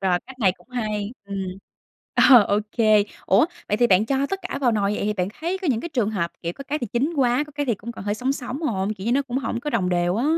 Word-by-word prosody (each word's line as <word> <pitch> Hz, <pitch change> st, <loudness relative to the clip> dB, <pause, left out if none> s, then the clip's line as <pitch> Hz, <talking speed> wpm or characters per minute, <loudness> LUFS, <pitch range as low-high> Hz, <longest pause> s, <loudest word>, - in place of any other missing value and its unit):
rồi, 185 Hz, -2 st, +2 dB
cách 260 Hz, 0 st, -12 dB
này 190 Hz, -3 st, +4 dB
cũng -, -, -24 dB
hay, 215 Hz, -3 st, -2 dB
ừm. 200 Hz, 0 st, -5 dB, 0.9 s
Ờ, 245 Hz, -4 st, +10 dB
ô 205 Hz, 0 st, +1 dB
kê. 215 Hz, -3 st, +4 dB, 0.2 s
Ủa, 195 Hz, +10 st, +5 dB, 0.2 s
vậy 210 Hz, -, +1 dB
thì 240 Hz, +2 st, +4 dB
bạn 195 Hz, 0 st, +4 dB
cho 275 Hz, +2 st, +1 dB
tất 390 Hz, +6 st, -3 dB
cả 365 Hz, -6 st, -4 dB
vào 250 Hz, -4 st, +3 dB
nồi 205 Hz, -1 st, +1 dB
vậy -, -, -2 dB
thì 210 Hz, -, +1 dB
bạn 185 Hz, -3 st, -1 dB
thấy 345 Hz, +4 st, -1 dB
có 360 Hz, -, 0 dB
những 235 Hz, -4 st, +1 dB
cái -, -, -5 dB
trường 240 Hz, -9 st, 0 dB
hợp, 180 Hz, -6 st, -2 dB
kiểu, 170 Hz, 0 st, -2 dB
có 275 Hz, -, -10 dB
cái 300 Hz, +2 st, -1 dB
thì 240 Hz, -, -3 dB
chín 275 Hz, +8 st, +1 dB
quá, 255 Hz, +1 st, +2 dB
có 295 Hz, -, -15 dB
cái 290 Hz, -1 st, -2 dB
thì 235 Hz, -, +2 dB
cũng 225 Hz, +4 st, -8 dB
còn 195 Hz, -, -9 dB
hơi 205 Hz, 0 st, 0 dB
sống 255 Hz, +4 st, -1 dB
sống 275 Hz, +2 st, -5 dB
hông? 210 Hz, -7 st, -1 dB
Kiểu 190 Hz, -, -9 dB
như 235 Hz, -, +2 dB
nó 275 Hz, +2 st, +3 dB
cũng 260 Hz, -1 st, -3 dB
hổng 240 Hz, -3 st, -3 dB
có 295 Hz, -, -3 dB
đồng 200 Hz, -8 st, +1 dB
đều 175 Hz, +1 st, +1 dB
á. 235 Hz, -, 0 dB
235 Hz, 295 wpm, -23 LUFS, 200-270 Hz, 0.9 s, Ờ